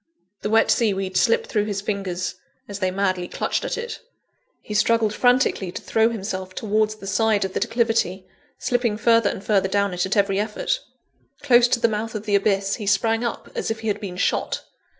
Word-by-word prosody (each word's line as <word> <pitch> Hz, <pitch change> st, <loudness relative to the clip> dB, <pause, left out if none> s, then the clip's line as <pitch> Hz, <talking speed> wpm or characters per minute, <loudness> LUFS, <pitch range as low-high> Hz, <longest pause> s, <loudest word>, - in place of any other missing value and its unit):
The -, -, -2 dB
wet 225 Hz, +1 st, +4 dB
sea 220 Hz, -4 st, +2 dB
weed 190 Hz, -1 st, -4 dB
slipped 465 Hz, 0 st, +3 dB
through 210 Hz, -, 0 dB
his 205 Hz, -2 st, -2 dB
fingers, 195 Hz, -3 st, -3 dB, 0.3 s
as 200 Hz, -1 st, -6 dB
they 185 Hz, -2 st, +1 dB
madly 185 Hz, -1 st, -1 dB
clutched -, -, -2 dB
at -, -, -2 dB
it. 470 Hz, -1 st, -5 dB, 0.6 s
He 210 Hz, -, -6 dB
struggled 220 Hz, 0 st, +2 dB
frantically 245 Hz, -7 st, +2 dB
to -, -, -6 dB
throw 225 Hz, 0 st, +2 dB
himself 190 Hz, -4 st, -5 dB
towards 215 Hz, 0 st, 0 dB
the 215 Hz, -, -12 dB
side 205 Hz, 0 st, +2 dB
of 190 Hz, -, -5 dB
the -, -, -1 dB
declivity; 225 Hz, -4 st, 0 dB, 0.3 s
slipping 240 Hz, -4 st, 0 dB
further 230 Hz, -2 st, +4 dB
and 190 Hz, -, -6 dB
further 195 Hz, -3 st, +2 dB
down 200 Hz, -1 st, +1 dB
it 180 Hz, +1 st, -1 dB
at 205 Hz, -, -1 dB
every 200 Hz, -1 st, +2 dB
effort. 215 Hz, -, -1 dB, 0.6 s
Close 245 Hz, -3 st, +6 dB
to 240 Hz, -, +1 dB
the 230 Hz, -, +3 dB
mouth 220 Hz, +1 st, -3 dB
of 215 Hz, 0 st, -5 dB
the 210 Hz, -, -1 dB
abyss, 195 Hz, 0 st, +2 dB
he 210 Hz, -4 st, -6 dB
sprang 225 Hz, +3 st, +2 dB
up 235 Hz, -, -4 dB
as -, -, -3 dB
if 225 Hz, 0 st, -3 dB
he 220 Hz, -, -2 dB
had 205 Hz, +1 st, -2 dB
been 185 Hz, -3 st, -6 dB
shot. -, -, 0 dB
210 Hz, 205 wpm, -23 LUFS, 195-225 Hz, 0.6 s, Close